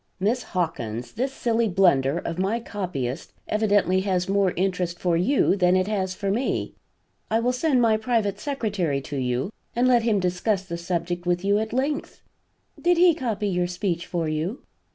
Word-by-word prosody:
"Miss 225 +6 +1
Hawkins, 125 - -3
this 260 +4 -2
silly 235 -3 0
blunder 170 -6 +3
of 170 0 -4
my 200 +5 0
copyist 180 - -4
evidently 205 -3 +2
has 185 -1 0
more 195 -1 +2
interest 180 -2 -1
for 175 -1 +1
you 190 +5 +3
than 180 -2 +3
it 185 0 +2
has 190 -3 -1
for 195 0 -2
me. 240 +6 -1 0.6
I 225 - +2
will 245 +2 +1
send 255 -1 +2
my 220 -1 +4
private 220 -3 0
secretary 205 - -1
to 145 +1 -6
you 125 - -1 0.2
and 245 +2 +3
let 245 -2 +5
him 225 -3 +2
discuss 185 +2 0
the 170 -2 -5
subject 175 0 -3
with 175 +1 0
you 200 +1 +3
at 220 0 -3
length." 275 +5 -2 0.6
"Did 350 0 +3
he 350 0 +6
copy 225 -8 -2
your 180 -2 0
speech 175 -1 -2
for 170 -3 -2
you?" 155 - -3
195 Hz, 175 wpm, -24 LUFS, 175-225 Hz, 0.6 s, he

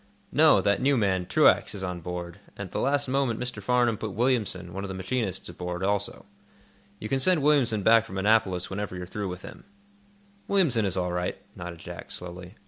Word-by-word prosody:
"No; - - +6
that 100 +3 +1
new 140 +1 +3
man, 95 -5 +1
Truax, - - +4
is 95 - -5
on 90 -1 -3
board, 85 +1 -6 0.2
and 100 - -4
at 90 - -12
the - - -2
last 140 +1 +1
moment 130 -3 0
Mr. 125 -4 -3
Farnum 120 0 +2
put 110 -3 -4
Williamson, 105 -7 0
one 95 +1 -4
of - - -4
the 95 - -6
machinists, 95 0 -2
aboard, 90 +1 -5
also. 100 +1 -1 0.7
You 110 - -6
can 135 +4 0
send 170 +1 +3
Williamson 125 -8 +3
back 115 +1 +5
from 95 - -7
Annapolis 95 -3 +2
whenever 100 -1 -4
you're 90 0 -5
through 100 +3 -4
with 90 0 -7
him." - - -11 0.8
"Williamson 155 - +3
is 95 -1 0
all 90 -1 -1
right," 90 0 -2 0.2
nodded 85 -1 -7
Jack, - - -9
slowly. 90 +2 -9
100 Hz, 200 wpm, -27 LUFS, 90-120 Hz, 0.8 s, No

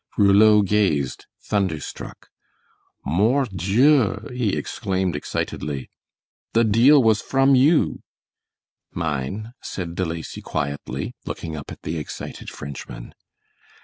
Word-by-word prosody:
Rouleau 105 +1 +6
gazed 95 -10 0 0.2
thunderstruck. 95 -7 -3 0.8
"Mort 115 - +2
Dieu!" 110 - +3
he 120 -6 0
exclaimed, 95 -3 -2
excitedly. 75 -1 -4 0.6
"The 115 - +4
deal 120 +6 +6
was 110 -2 +3
from 135 0 +3
you." 145 +5 +3 0.9
"Mine," 85 - -3
said 85 -3 -5
De 95 - -1
Lacy, 80 -1 -5
quietly, 70 -3 -4
looking 80 -1 -5
up 70 - -8
at - - -11
the 80 +1 -3
excited 75 - -7
Frenchman. 70 -3 -8
100 Hz, 105 wpm, -23 LUFS, 80-115 Hz, 0.9 s, Rouleau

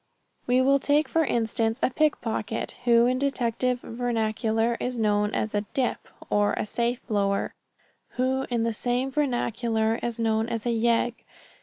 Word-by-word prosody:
We 250 +1 +4
will 275 +1 +4
take 295 +3 +2
for 325 - +2
instance 225 -1 0
a - - +3
pickpocket, 230 -6 -1
who 235 -1 +5
in 255 +1 +1
detective 250 -2 0
vernacular 225 -1 0
is 250 0 -3
known 210 -2 +2
as 215 - -1
a 205 - +1
"dip"; 255 -3 -1 0.2
or 205 0 +2
a - - -2
safe 235 +3 -2
blower, 200 -3 0 0.6
who 260 +1 0
in 235 -2 0
the 230 0 0
same 245 +4 -1
vernacular 235 -5 0
is 235 -1 -3
known 225 0 +1
as 230 -1 -3
a - - +1
"yegg." 235 +1 +2
235 Hz, 155 wpm, -26 LUFS, 225-250 Hz, 0.6 s, who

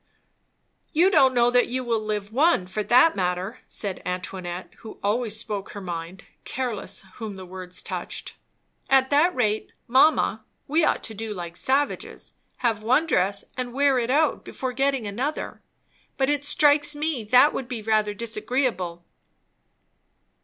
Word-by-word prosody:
"You 350 +5 +4
don't 265 -7 +5
know 240 0 +4
that 245 0 +4
you 255 +1 -3
will 230 -2 0
live 210 -1 -4
one, 285 - +3
for 185 +4 -3
that 255 +9 +5
matter," 185 +4 -2
said 200 -3 -4
Antoinette, 180 0 -5
who 220 - -11
always 215 +1 0
spoke 205 -3 -4
her 205 - -6
mind, 175 -1 -6 0.2
careless 245 -7 -3
whom 220 -4 -6
the 190 -1 -9
words 180 0 -7
touched. - - -5 0.6
"At 265 0 +4
that 305 +5 +4
rate, 215 -4 -1
mamma, 260 -3 +3 0.2
we 315 +4 +2
ought - - +1
to 220 - -6
do 220 0 -5
like 175 -2 -7
savages, 270 - -2 0.3
have 225 -3 +1
one 255 +8 +3
dress 200 - +1
and 250 -2 -4
wear 275 -1 +3
it 235 0 -2
out 300 +3 +2
before 260 -1 -4
getting 270 -2 0
another; 250 +10 -4 0.6
but 270 +1 +2
it 290 -1 -1
strikes 295 0 +5
me 295 -5 -2
that 250 +7 +5
would 260 - -4
be 235 -3 -5
rather 215 -1 +1
disagreeable." 215 -6 -2
235 Hz, 155 wpm, -24 LUFS, 200-270 Hz, 0.6 s, don't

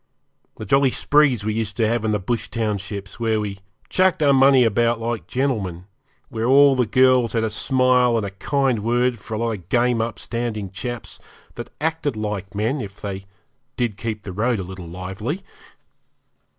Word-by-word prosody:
The 110 - -6
jolly 135 +5 +4
sprees 135 -5 +2
we 110 - 0
used 110 -2 -3
to 110 - +2
have 115 0 0
in 110 - 0
the 105 - +2
bush 105 +3 -2
townships, 100 -3 -4
where 110 -2 +1
we 100 -2 -4 0.3
chucked 185 -4 +2
our 140 -1 +5
money 135 -1 +6
about 115 +1 +2
like 115 0 -3
gentlemen, 105 -10 -2 0.4
where 115 -3 -3
all 140 +1 +6
the 125 -3 +1
girls 130 +1 +4
had 115 -1 +1
a 110 - -1
smile 125 0 +2
and 110 - -1
a 100 - -5
kind 130 +4 0
word 120 +1 +1
for 110 - -6
a - - -2
lot 115 +1 -1
of 95 -5 -7
game 120 0 +2
upstanding 115 -3 -4
chaps, 120 +4 -6 0.3
that - - -7
acted 160 -4 -1
like 105 -2 -4
men, 115 +7 0
if 100 -2 -8
they 95 -1 -6 0.5
did 120 -5 -1
keep 105 0 -5
the 95 - -7
road 115 +4 +1
a 95 - -3
little 90 -1 -9
lively. 95 - -5
115 Hz, 180 wpm, -22 LUFS, 105-125 Hz, 0.5 s, money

